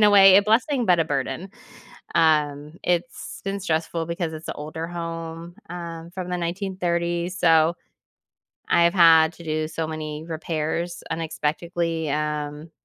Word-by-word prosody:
in 210 - +6
a 210 - +7
way, 195 -1 +8
a 200 - +6
blessing, 235 +4 +2
but 175 -2 +4
a 165 - +3
burden. 145 +6 -3 0.6
Um, 150 -2 +2
it's 175 -1 -2
been 195 0 -2
stressful 165 -2 -1
because 170 -1 -3
it's 155 0 -8
a - - -3
older 155 +2 -5
home, 165 0 -6
um, 170 -1 -7
from 180 0 -6
the 180 - 0
1930s, 175 -1 -2
so 165 0 +4 1.0
I've 170 +1 +4
had 165 -2 +6
to 170 - -13
do 155 0 -1
so 160 0 -3
many 155 -1 -5
repairs 165 +1 -3
unexpectedly, 165 0 -2
um, 150 +1 -3
165 Hz, 145 wpm, -24 LUFS, 155-175 Hz, 1.0 s, way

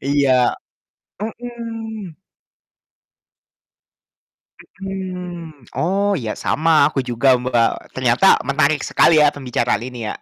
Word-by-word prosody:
Iya. 140 0 +2 0.9
Mhm. 225 -5 -7 2.6
Mhm, 180 - -7
oh, 200 +4 +1
iya 110 -3 -3
sama 155 -2 +2
aku 150 - -5
juga, 125 +2 +2
Mbak, 120 -2 -1
ternyata 130 +8 +4
menarik 145 +1 +2
sekali 160 -2 +4
ya 150 - +6
pembicaraan 125 -5 -1
ini 120 -3 -6
ya. - - -4
155 Hz, 95 wpm, -19 LUFS, 130-190 Hz, 2.6 s, ya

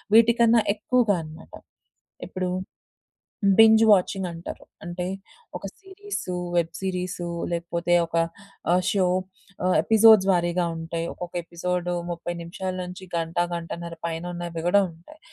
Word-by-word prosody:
వీటికన్నా 230 0 +6 0.2
ఎక్కువగా 225 -1 +2
అన్నమాట. 155 +1 -12 0.7
ఇప్పుడు 185 -1 -3 1.1
బింజ్ 220 0 +8
వాచింగ్ 190 -1 +2
అంటారు. 170 0 -8 0.2
అంటే 175 +1 -4 0.5
ఒక - - -18 0.2
సీరీసు 385 - -6 0.2
వెబ్ 170 -1 +1
సీరీసు 180 -2 -3 0.2
లేకపోతే 170 0 -1
ఒక 165 - -6 0.6
ఆహ్, 180 +1 +3
షో 195 -2 +2 0.6
ఆహ్, 185 - +3
ఎపిసోడ్స్ 220 -3 +6
వారీగా 175 0 +1
ఉంటాయి, 165 +1 -4
ఒక్కొక్క 175 0 -8
ఎపిసోడ్ 175 +1 -3 0.2
30 175 0 -4
నిమిషాల 185 +2 -5
నుంచి 180 +1 -8
గంట, 165 0 -3 0.2
గంటన్నర 170 0 -6
పైన 165 0 -4
ఉన్నవి 170 -1 -5
గూడా 200 +3 +5
ఉంటాయి. 170 - -17
180 Hz, 120 wpm, -25 LUFS, 170-200 Hz, 1.1 s, బింజ్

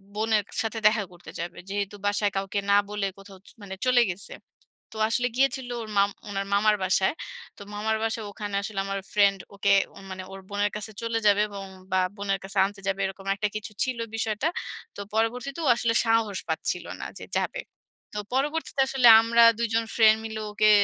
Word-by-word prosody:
বোনের 215 0 +2
কা - - -15
সাথে 225 0 -3
দেখা 215 -1 +2
করতে 175 0 -12
যাবে। 170 +1 -5
যেহেতু 200 0 -2
বাসায় 205 0 +1
কাউকে 195 +1 -1
না - - +6
বলে 210 -1 -2
কোথাও 195 -1 -13
চ - - -13
মানে 195 -1 -7
চলে 250 -1 +5
গেছে। 180 +3 -7 0.6
তো - - -9
আসলে 245 +2 +1
গিয়েছিল 265 -1 +1
ওর 225 - -7
মাম 200 0 +5 0.2
উনার 195 -1 -2
মামার 210 +1 +4
বাসায়। 190 +3 +2 0.4
তো - - -13
মামার 220 +1 0
বাসায় 225 -1 -2
ওখানে 205 -1 -5
আসলে 200 -1 -4
আমার 195 0 -2
ফ্রেন্ড 200 -1 +4 0.2
ওকে 200 0 +2 0.4
মানে 185 0 -6
ওর 195 - -8
বোনের 205 0 0
কাছে 210 +1 -6
চলে 230 0 -1
যাবে 205 0 +5
এবং 200 -1 -7 0.3
বা 185 - +3 0.2
বোনের 195 -1 -1
কাছে 195 +1 -7
আনতে 200 0 -7
যাবে 195 0 0
এরকম 195 0 -6
একটা 210 +1 0
কিছু 215 0 -5
ছিল 260 -2 -2 0.2
বিষয়টা। 220 +4 -1 0.5
তো - - -10 0.2
পরবর্তীতে 245 +6 -1
ও - - +1
আসলে 235 -1 0
সাহস 225 -3 +2
পাচ্ছিল - - -1 0.2
না - - -4
যে - - -8
যাবে। - - -2 0.5
তো 210 - -3
পরবর্তীতে 295 +1 0
আসলে 265 -2 +4
আমরা 230 +1 +4 0.2
২ 235 - +1
জন 230 0 +2
ফ্রেন্ড 220 -1 +6
মিলে 220 -1 -5
ওকে 215 +1 +3
210 Hz, 195 wpm, -26 LUFS, 200-225 Hz, 0.6 s, না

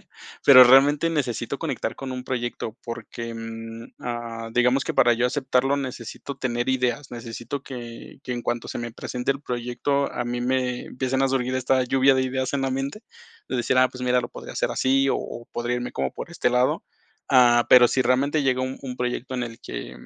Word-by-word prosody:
tener, - - -29 0.4
pero 130 -2 +10
realmente 140 +5 +5
necesito 135 -5 -2
conectar 135 -8 -3
con 135 -1 -6
un 125 0 -6
proyecto 120 -3 -4
porque, 115 0 -6
mm, 115 0 -8
ah, 115 -1 -5
digamos 125 +3 +3
que - - -2
para 120 -1 +5
yo 120 +1 0
aceptarlo 135 0 +1
necesito 130 0 -6
tener 120 -2 -2
ideas, 130 +1 0
necesito 120 +3 -6
que 120 -3 -9
que 125 - -4
en 120 -1 -4
cuanto 120 0 -2
se - - -4
me 120 -1 -5
presente 125 +2 -3
el 140 0 -1
proyecto, 125 +2 -1
a 120 - -3
mí 120 0 -3
me 125 0 -1
empiecen 130 +1 -1
a 135 - +3
surgir 130 -1 0
esta 130 0 +2
lluvia 135 +1 +4
de 130 - +2
ideas 130 0 -2
en 135 - 0
la 135 - 0
mente, 135 +9 -3 0.5
de - - -2
decir: 125 +1 +1
"Ah, 130 0 +5
pues 125 0 -9
mira, 125 0 +3
lo 120 - -5
podría - - -9
hacer - - -1
así, 135 +1 +2
o - - +2
o, 120 - -8
podría 120 +1 -1
irme 125 0 -4
como 65 -1 -2
por - - -7
este 125 - 0
lado". 125 +1 +1 0.5
Ah, 120 -2 +5
pero 125 -1 +8
si 130 - +1
realmente 140 +5 +2
llega 130 -1 +1
un 130 +1 -4
un 125 -2 -6
proyecto 125 +1 -3
en 125 - -1
el 115 -1 -9
que - - -7
125 Hz, 210 wpm, -24 LUFS, 120-135 Hz, 0.5 s, pero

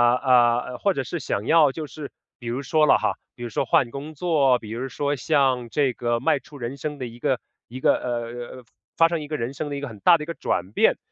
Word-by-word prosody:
呃， 125 -1 +3
或 200 - +2
者 135 - -2
是 170 +7 -4
想 105 -6 -3
要 155 -2 +5
就 155 +3 -5
是 145 -1 -8 0.3
比 120 - -9
如 120 +3 -2
说 155 +2 +3
了 150 - +6
哈， - - -1 0.2
比 120 - -9
如 120 - -4
说 115 - -1
换 120 0 +2
工 145 +4 -7
作， 145 -6 +3
比 110 -2 -10
如 120 +4 -3
说 145 +2 -1
像 130 -3 +1
这 135 0 +1
个 120 0 -1
迈 135 +3 +2
出 150 0 -14
人 120 0 -5
生 150 +1 -4
的 130 - -5
一 120 0 -10
个 130 -2 0 0.3
一 125 +2 -8
个， - - +4
呃， 120 +1 -5 0.3
发 165 - +6
生 170 -2 -2
一 150 - -7
个 155 - -3
人 120 +1 -3
生 145 +1 -4
的 145 - -4
一 - - -3
个 145 - -4
很 110 -4 -10
大 170 - +6
的 150 - -6
一 - - -6
个 170 - -3
转 95 - -2
变。 - - +3
130 Hz, 275 characters per minute, -24 LUFS, 120-150 Hz, 0.3 s, 了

